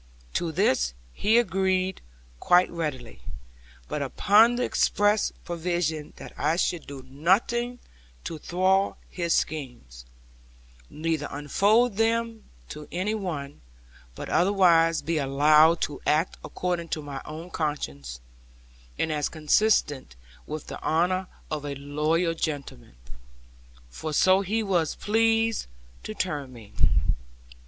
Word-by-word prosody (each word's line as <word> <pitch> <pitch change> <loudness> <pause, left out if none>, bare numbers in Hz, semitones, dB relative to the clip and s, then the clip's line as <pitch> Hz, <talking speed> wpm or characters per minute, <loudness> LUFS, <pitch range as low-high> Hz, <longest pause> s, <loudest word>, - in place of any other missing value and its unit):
To 170 -2 -1
this 130 - +1 0.2
he 220 - +3
agreed 190 -3 +1 0.4
quite 180 - +4
readily; 130 - -5 0.7
but - - -3
upon 220 +4 +4
the 250 - -1
express 205 -2 +2
provision 170 -3 -2
that - - -11
I 160 - +2
should 175 -2 -1
do 140 -2 -8
nothing 210 - +1 0.5
to 160 - -6
thwart 190 +4 +1
his 170 -2 0
schemes, 120 - -4 0.8
neither 155 -1 -2
unfold 200 - +2
them 225 0 0 0.2
to 150 - -8
any 185 +5 -1
one; 155 -9 -5 0.5
but - - -7
otherwise 170 -3 +3
be 165 -1 0
allowed 150 +4 +4
to 145 - -3
act 155 +4 +2
according 175 -2 -3
to 155 - -7
my 140 -2 -6
own 160 +4 -8
conscience, 70 - -4 0.8
and 160 - 0
as 150 -1 -1
consisted 155 - +1 0.3
with 155 -1 -5
the - - -8
honour 180 +4 +1 0.2
of 150 -2 -3
a 145 -1 -4
loyal 150 +5 0
gentleman 145 - -5 1.0
for 155 - -5
so 185 +5 +4
he 215 +4 -1
was 175 -6 0
pleased 225 +1 +1 0.3
to 215 - -7
term 145 -9 -3
me. 110 -3 -14
165 Hz, 120 wpm, -26 LUFS, 145-195 Hz, 1.0 s, quite